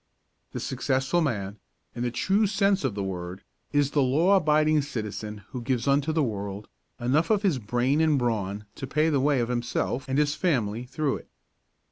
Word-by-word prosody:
The - - -3
successful 135 +6 0
man, 105 -8 -2 0.3
in 120 - -6
the 125 - 0
true 200 - +2
sense 195 -1 +2
of 130 -7 -1
the 100 - -2
word, 90 0 -5 0.3
is 145 -1 +2
the 145 - +2
law 155 +10 +4
abiding 155 -3 +3
citizen 105 -6 -5
who 125 - -5
gives 120 0 -1
unto 140 +2 +2
the 155 -1 +1
world 100 -3 -4 0.3
enough 135 +7 +1
of 215 -2 +2
his 175 -10 +2
brain 125 +7 +1
and 155 -2 +3
brawn 105 -5 -1
to 135 - -5
pay 155 +4 +2
the 145 -3 +2
way 140 -1 +2
of 115 - -2
himself 125 +2 -2
and 135 - 0
his 145 -1 +2
family 120 - 0
through 135 +2 -1
it. - - -15
130 Hz, 185 wpm, -26 LUFS, 115-155 Hz, 0.3 s, law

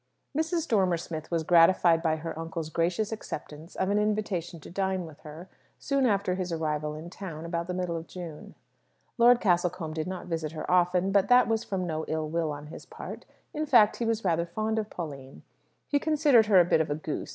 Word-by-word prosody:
Mrs. 325 +1 0
Dormer 190 -6 +2
Smith 160 -2 -6
was 165 -2 0
gratified 170 0 +5
by 160 -2 +1
her 165 +1 -5
uncle's 165 -1 -5
gracious 175 +7 0
acceptance 155 -6 -7
of 190 +1 0
an 205 - +2
invitation 205 -5 -1
to - - -11
dine 190 -1 -1
with 155 -3 -12
her, 155 +4 -10 0.3
soon 275 -2 +1
after 200 -4 +1
his 185 -1 -3
arrival 150 -2 -2
in 160 +3 -9
town, 165 -5 -7
about 170 0 -3
the 180 - -3
middle 180 -2 -2
of 165 0 -6
June. 170 -4 -9 0.6
Lord 240 +1 +7
Castlecombe 175 -4 0
did 155 +1 -3
not 185 0 -5
visit 160 -2 -3
her 155 - -6
often; 180 +1 +3
but 200 0 +3
that 250 +2 +6
was 225 -1 0
from 190 -2 -3
no 160 -2 -3
ill 155 -1 -2
will 160 0 -1
on 145 0 -7
his 150 - -10
part. - - -9 0.3
In 305 +1 -2
fact, 230 -7 +5
he 235 - -2
was 225 -2 -1
rather 170 -1 +1
fond 215 +5 -1
of 215 -1 -4
Pauline. 140 -6 -8 0.4
He 290 - +2
considered 290 -7 +4
her 200 -3 +6
a 175 - +6
bit 160 - +3
of 160 - -2
a 145 - 0
goose. 155 0 -5
175 Hz, 210 wpm, -28 LUFS, 160-205 Hz, 0.6 s, Lord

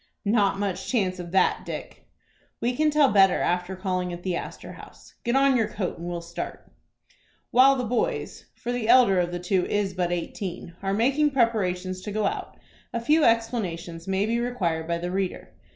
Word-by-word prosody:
"Not 200 -2 +2
much 200 -2 -3
chance 190 -7 0
of 175 -1 -6
that, 190 +2 +2
Dick." - - -8 0.5
"We 245 +1 0
can 310 +3 +3
tell 295 -3 +4
better 195 -2 +5
after 180 +1 -1
calling 185 -1 -2
at 175 0 -7
the 185 -2 -1
Astor - - -7
House. - - -14
Get 240 +2 0
on 275 0 +4
your 225 -3 +2
coat 190 -5 -4
and 170 - -6
we'll 175 -1 -4
start." 170 - -7 0.8
While 265 +2 +6
the 255 - -2
boys, 450 - -2
for 240 - -4
the 245 -2 -2
elder 240 -7 +6
of 175 0 0
the 175 - -3
two 180 +1 0
is 205 -2 0
but 180 -1 -1
eighteen 175 0 -4
are 195 0 -1
making 275 +7 +3
preparations 185 -8 0
to 205 - -6
go 215 0 0
out, - - -3 0.3
a 235 - -2
few 300 +7 +3
explanations 190 -8 0
may 195 +1 +1
be 230 +2 0
required 175 -10 -1
by 170 0 0
the 175 +1 -4
reader. 190 -1 -3
195 Hz, 190 wpm, -25 LUFS, 180-240 Hz, 0.8 s, While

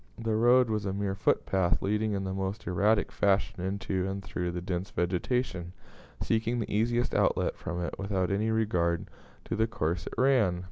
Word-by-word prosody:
The 115 -1 -1
road 120 +1 +5
was 105 -2 -1
a 95 - -1
mere 100 0 -1
footpath, 95 -2 +1
leading 105 +2 0
in 100 -1 -1
the 95 0 -3
most 95 +2 -3
erratic 100 +5 +2
fashion 100 -2 +1
into 95 -1 -2
and 100 0 -4
through 90 -2 -3
the 90 0 -3
dense 90 +2 -3
vegetation, 90 0 -1 0.5
seeking 115 +2 0
the 115 - -3
easiest 120 +3 +1
outlet - - +2
from 90 -2 -5
it 85 - -3
without 95 -1 -1
any 105 +3 +1
regard 90 -7 +1 0.4
to - - -2
the 110 +1 +2
course 85 -4 -2
it - - -6
ran. 125 -10 +3
100 Hz, 180 wpm, -29 LUFS, 90-110 Hz, 0.5 s, road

